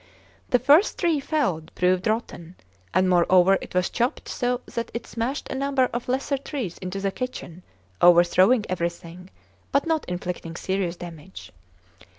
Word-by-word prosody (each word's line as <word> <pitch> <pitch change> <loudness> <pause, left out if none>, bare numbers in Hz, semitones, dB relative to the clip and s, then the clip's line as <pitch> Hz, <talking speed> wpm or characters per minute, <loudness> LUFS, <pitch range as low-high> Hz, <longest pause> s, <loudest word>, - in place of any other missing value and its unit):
The 250 - +4
first 290 - +4
tree 335 -5 +1
felled 235 - -1
proved 180 +1 +1
rotten, 185 -6 -3 0.4
and 185 0 +2
moreover 180 +1 +4
it - - -10
was 180 -1 +1
chopped 240 +2 -1
so 245 0 -1
that 235 - -3
it 235 - -4
smashed 240 +5 -3
a - - -3
number 270 -1 +1
of 240 +1 -4
lesser 270 +2 -1
trees 260 - -5
into 185 +1 -5
the 195 0 -1
kitchen, 190 -8 -6 0.4
overthrowing 180 +6 +5
everything, 170 0 -5 0.4
but 280 - +2
not 320 -2 0
inflicting 180 -2 -5
serious 190 -1 -2
damage. 175 0 -10
195 Hz, 150 wpm, -24 LUFS, 175-255 Hz, 0.4 s, overthrowing